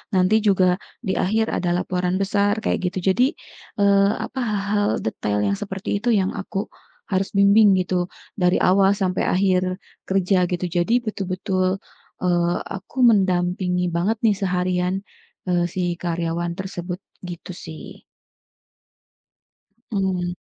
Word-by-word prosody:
nanti 185 +4 +4
juga 185 -3 +4 0.3
di 190 -4 -1
akhir 220 +4 +1
ada 175 -1 0
laporan 180 0 -1
besar, 205 +2 +1
kayak - - 0
gitu. 190 0 +1
Jadi, 255 +7 +3 0.5
eee, 200 0 +4
apa, 260 - -5
hal-hal 205 -1 0
detail 105 -1 -1
yang 200 - +1
seperti 200 -1 -3
itu 245 - +1
yang 195 -3 +2
aku 195 +1 -4 0.4
harus 190 0 0
bimbing 200 +1 +6
gitu, 180 -1 0 0.3
dari 180 -3 +2
awal 195 +1 +4
sampai 185 -2 0
akhir 185 0 +1 0.3
kerja, 190 -1 +2
gitu. 180 0 -1
Jadi, 175 +8 +1
betul-betul, 185 -2 -1 0.4
eee, 175 -1 +2
aku 195 +6 -9
mendampingi 180 -3 +2
banget 190 +7 0
nih 210 -2 +4
seharian, 180 -1 0 0.5
e 175 -1 +2
si 175 -1 -1
karyawan 170 0 -2
tersebut, 180 -1 -5 0.2
gitu 180 0 -7
sih. 160 -2 -10 1.9
Mmm. 185 -3 -1
185 Hz, 125 wpm, -22 LUFS, 180-200 Hz, 1.9 s, bimbing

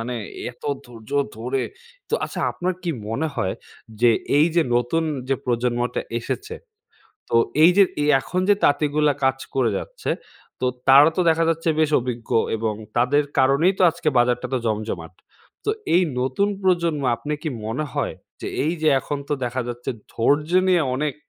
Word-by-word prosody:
মানে 120 +2 -4 0.4
এত 125 - -23 0.2
ধৈর্য 115 -3 -13 0.3
ধরে 125 +3 -2 0.5
তো - - 0
আচ্ছা - - -5
আপনার 185 +1 -2
কি 175 - -1 0.2
মনে 140 +8 -1
হয় 95 -7 -1 0.5
যে 120 -1 +6 0.3
এইযে 165 +2 +4
নতুন 125 +7 +1 0.3
যে 135 - +3
প্রজন্মটা 120 0 0 0.2
এসেছে। 425 - -4 0.8
তো - - +3 0.3
এইযে 180 +4 +7 0.2
এ - - +1 0.2
এখন 180 +8 -2
যে 205 - +7
তাঁতিগুলা 145 +1 +3
কাজ 135 0 +2 0.2
করে 130 -3 +2
যাচ্ছে, - - -5 0.5
তো 130 - +1 0.2
তারা 140 +3 +8
তো - - +2
দেখা 165 +1 +2
যাচ্ছে 165 0 0
বেশ 155 -1 +2
অভিজ্ঞ 120 -2 -5 0.3
এবং 110 -1 -1 0.2
তাদের 125 +5 +3 0.2
কারণেই 140 +8 +4
তো - - +2
আজকে 160 -1 -2
বাজারটা 120 0 +2
এতো 130 - -1
জমজমাট। 105 -7 -3 0.5
তো - - +1 0.2
এই 180 - +5 0.2
নতুন 135 +11 +1
প্রজন্ম 170 -5 +1
আপনি 150 +5 -5
কি 160 - -2 0.2
মনে 125 +8 -2
হয় - - -2 0.3
যে - - -5 0.2
এইযে 160 -1 0
এখন 145 - -4
তো - - -1
দেখা 125 +1 -2
যাচ্ছে 120 0 -4 0.2
ধৈর্য্যে 150 +9 +2
নিয়ে 175 -3 +4
অনেক 145 +1 -1
140 Hz, 160 wpm, -22 LUFS, 120-165 Hz, 0.8 s, তারা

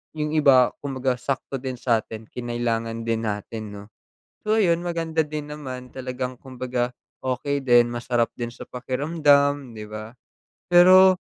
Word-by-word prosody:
yung 150 -1 -2
iba 130 -4 +5
kumbaga 130 -2 -2
sakto 135 0 -3
din 130 -1 -4
sa'tin 115 -2 -2
kinailangan 115 -2 -2
din 115 0 -1
natin 105 +2 -4
'no. 100 0 -9 0.6
So 215 - +3
ayun, 175 -6 +3
maganda 165 -2 -1
din 150 -1 -6
naman 130 -4 -7
talagang 130 -1 -5
kumbaga 125 -1 -3 0.3
okey 140 +2 -1
din 120 -1 +5
masarap 120 0 0
din 120 -1 -4
sa - - -10
pakiramdam 140 0 +1
'di 105 -1 -7
ba? 110 +2 -8 0.6
Pero 185 +1 +7
130 Hz, 140 wpm, -24 LUFS, 120-145 Hz, 0.6 s, Pero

